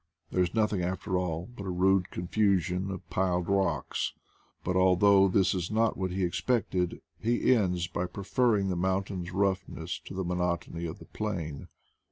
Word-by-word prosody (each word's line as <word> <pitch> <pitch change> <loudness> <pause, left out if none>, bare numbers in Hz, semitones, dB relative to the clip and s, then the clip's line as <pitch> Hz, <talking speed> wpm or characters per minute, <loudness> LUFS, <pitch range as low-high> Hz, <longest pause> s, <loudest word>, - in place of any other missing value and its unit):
There 90 - +2
is 90 +3 0
nothing 105 -4 +2
after 95 +1 -2
all 90 -2 -1
but 100 -4 -6
a - - -2
rude 90 +1 +2
confusion 95 0 0
of 95 -2 -6
piled 90 -2 +1
rocks; 95 -8 0 0.5
but 90 - -1
although 95 +2 +5
this 95 0 +3
is 90 -3 -2
not 110 +1 +2
what 95 -1 -2
he 95 +1 -1
expected, 90 -1 0 0.2
he 120 +3 +3
ends 90 -7 +1
by 90 +1 -2
preferring 100 +2 +1
the 90 - 0
mountain's 95 0 -1
roughness 95 -3 -1
to - - -8
the 95 - -1
monotony 85 -1 -2
of 80 - -6
the - - -13
plain. 85 -9 -4
95 Hz, 165 wpm, -29 LUFS, 90-100 Hz, 0.5 s, although